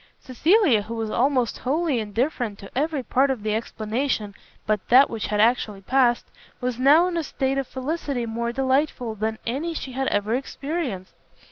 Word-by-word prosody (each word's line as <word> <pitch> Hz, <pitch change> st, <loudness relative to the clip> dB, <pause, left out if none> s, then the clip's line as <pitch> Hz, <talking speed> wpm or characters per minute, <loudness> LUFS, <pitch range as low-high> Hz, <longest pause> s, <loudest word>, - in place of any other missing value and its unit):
Cecilia, 295 Hz, -, +3 dB
who 225 Hz, +3 st, -6 dB
was 225 Hz, -1 st, -3 dB
almost 255 Hz, -2 st, +1 dB
wholly 295 Hz, 0 st, 0 dB
indifferent 225 Hz, 0 st, -2 dB
to 195 Hz, -, -13 dB
every 295 Hz, 0 st, 0 dB
part 265 Hz, +4 st, +2 dB
of 255 Hz, -6 st, -2 dB
the 215 Hz, -1 st, 0 dB
explanation 220 Hz, 0 st, -2 dB, 0.3 s
but 215 Hz, -2 st, -1 dB
that 260 Hz, +3 st, +6 dB
which 225 Hz, -2 st, -3 dB
had 210 Hz, 0 st, -1 dB
actually 215 Hz, -3 st, +2 dB
passed, 240 Hz, +2 st, +2 dB, 0.3 s
was 250 Hz, -1 st, -3 dB
now 295 Hz, +6 st, +6 dB
in 350 Hz, -2 st, -2 dB
a 330 Hz, -, 0 dB
state 270 Hz, -1 st, -1 dB
of 270 Hz, -, -3 dB
felicity 270 Hz, -2 st, -3 dB
more 235 Hz, +1 st, -2 dB
delightful 260 Hz, -2 st, 0 dB
than 220 Hz, +1 st, -2 dB
any 300 Hz, +8 st, -2 dB
she 265 Hz, -, -5 dB
had 265 Hz, +1 st, -2 dB
ever 205 Hz, +2 st, 0 dB
experienced. 270 Hz, -, -4 dB
250 Hz, 170 wpm, -24 LUFS, 220-275 Hz, 0.3 s, that